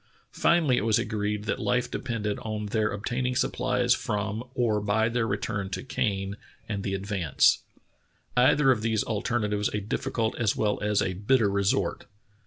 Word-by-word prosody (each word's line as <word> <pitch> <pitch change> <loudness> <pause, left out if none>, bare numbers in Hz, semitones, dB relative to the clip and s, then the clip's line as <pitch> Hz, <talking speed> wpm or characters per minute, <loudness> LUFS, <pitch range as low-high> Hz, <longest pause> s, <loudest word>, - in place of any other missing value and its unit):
Finally 160 -8 +3
it - - 0
was 110 -1 +3
agreed 105 0 -2
that 110 - -2
life 125 -1 0
depended 105 -4 -3
on 110 -1 -4
their 105 +1 0
obtaining 125 +5 -2
supplies 125 0 +1
from 110 -2 -2
or 110 -4 +1
by 110 +2 +2
their 115 -1 0
return 100 -3 -2
to - - -4
Kane 100 -5 -2 0.3
and 100 -2 -3
the 95 -1 -2
Advance 95 -6 +2 0.4
— - - -41
either 135 +3 +5
of 120 -4 +1
these 110 -1 +1
alternatives 105 -2 -1
a - - 0
difficult 110 +2 -2
as 110 -3 +2
well 105 -1 0
as 105 -1 +2
a 95 - -1
bitter 105 +3 +2
resort. 100 0 0
105 Hz, 165 wpm, -27 LUFS, 100-120 Hz, 0.4 s, either